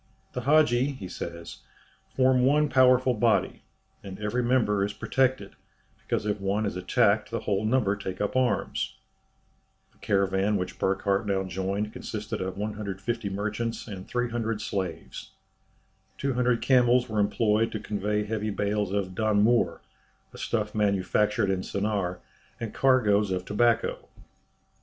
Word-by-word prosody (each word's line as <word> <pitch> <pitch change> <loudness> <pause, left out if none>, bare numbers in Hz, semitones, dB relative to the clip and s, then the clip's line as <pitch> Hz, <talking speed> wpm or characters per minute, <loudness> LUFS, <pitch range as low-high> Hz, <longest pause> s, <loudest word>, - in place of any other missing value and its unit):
"The 125 - -3
Hadji," 140 -1 +3
he 100 -8 -8
says, 85 -1 -7 0.6
"form 130 -1 +4
one 150 +3 +3
powerful 130 -1 +4
body, 115 0 +1 0.4
and 95 -1 -8
every 105 +4 -1
member 120 -5 +2
is 100 +1 -2
protected, 130 -6 0 0.5
because - - -2
if 105 -1 -2
one 100 +2 0
is 100 - -3
attacked 100 +3 +2
the 115 -1 -3
whole 100 -1 -1
number 110 -3 +2
take 95 -2 -6
up 105 +3 -2
arms." 130 -1 0 1.0
The - - -31
caravan 100 +1 +1
which 90 -1 -5
Burckhardt 100 +2 0
now 95 -1 0
joined 95 +3 -3
consisted 105 -1 -5
of 95 0 -4
150 105 +1 -3
merchants 110 +4 -3
and 95 -3 -8
300 120 -3 -2
slaves. 95 -6 -5 0.8
Two 140 -1 -1
hundred 125 -1 +1
camels 125 -1 +4
were 110 -2 -2
employed 105 +2 +2
to 110 - -4
convey 105 0 -1
heavy 110 0 -3
bales 105 0 -1
of 100 -2 -2
"danmour," 110 +3 +2 0.5
a - - -11
stuff 105 -2 -2
manufactured 105 0 +1
in 95 -1 -1
Sennaar, 100 -3 -2 0.4
and 115 -2 -5
cargoes 105 -6 +3
of 90 -1 -2
tobacco. 115 +3 +1
105 Hz, 140 wpm, -27 LUFS, 100-120 Hz, 1.0 s, form